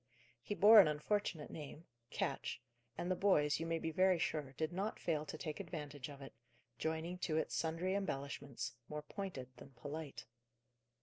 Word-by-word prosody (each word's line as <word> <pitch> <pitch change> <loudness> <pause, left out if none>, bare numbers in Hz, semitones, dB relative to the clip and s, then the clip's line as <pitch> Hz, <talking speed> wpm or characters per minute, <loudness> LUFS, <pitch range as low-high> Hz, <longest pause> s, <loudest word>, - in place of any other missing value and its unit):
He 205 - -3
bore 215 +2 +10
an 190 - +9
unfortunate 155 +1 -1
name 155 +1 -8 0.2
Ketch - - -2 0.4
and 175 - -1
the - - +3
boys, 150 -8 +3
you 165 - -2
may 165 0 +1
be 160 0 -2
very 185 +1 +4
sure, 150 -4 -1
did 155 +4 -2
not 200 +4 -2
fail 155 -2 0
to 155 - -5
take 155 -2 -4
advantage 150 -7 -5
of 140 -1 -9
it, 135 - -9 0.5
joining 160 +3 -2
to 160 -3 0
it 160 - 0
sundry 165 +3 0
embellishments, 140 -9 -3 0.2
more 150 0 -4
pointed 165 - -5
than 135 - -12
polite. 145 +3 -6
160 Hz, 170 wpm, -38 LUFS, 150-180 Hz, 0.5 s, bore